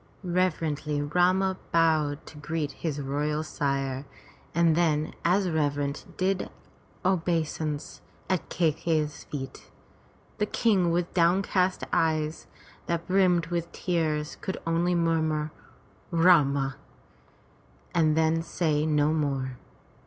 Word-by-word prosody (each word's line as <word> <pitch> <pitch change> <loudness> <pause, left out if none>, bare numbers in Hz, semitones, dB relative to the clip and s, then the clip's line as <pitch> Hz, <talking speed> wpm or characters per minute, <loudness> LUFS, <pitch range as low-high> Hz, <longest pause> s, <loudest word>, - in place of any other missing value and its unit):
Reverently 160 -5 0
Rama 180 +5 +2
bowed 155 -3 +2
to 150 - -11
greet 150 -1 -2
his 150 -4 -4
royal 150 +2 -1
sire, 135 -3 -2 0.5
and 170 -2 +4
then 155 -3 +1
as 185 +3 +3
reverent, 145 -3 -1
did 185 0 0 0.6
obeisance 160 -4 -1 0.3
at 185 -3 -1
Kai 165 -3 +2
key'i's 155 -1 -2
feet. 135 -2 -7 0.7
The 210 - +1
King 200 -8 +2
with 175 +1 -1
down 180 +2 +3
cast 185 -1 +1
eyes, 155 -1 0 0.4
that 170 0 -1
brimmed 185 -3 +3
with 170 0 -2
tears, 155 -4 -1
could 190 - -3
only 170 +2 +1
murmur, 160 -2 +1 0.6
Rama!" 145 -6 +4 1.2
and 155 -2 +3
then 160 0 +3
say 155 -2 0
no 150 0 +3
more. 135 -4 -1
160 Hz, 110 wpm, -27 LUFS, 150-175 Hz, 1.2 s, and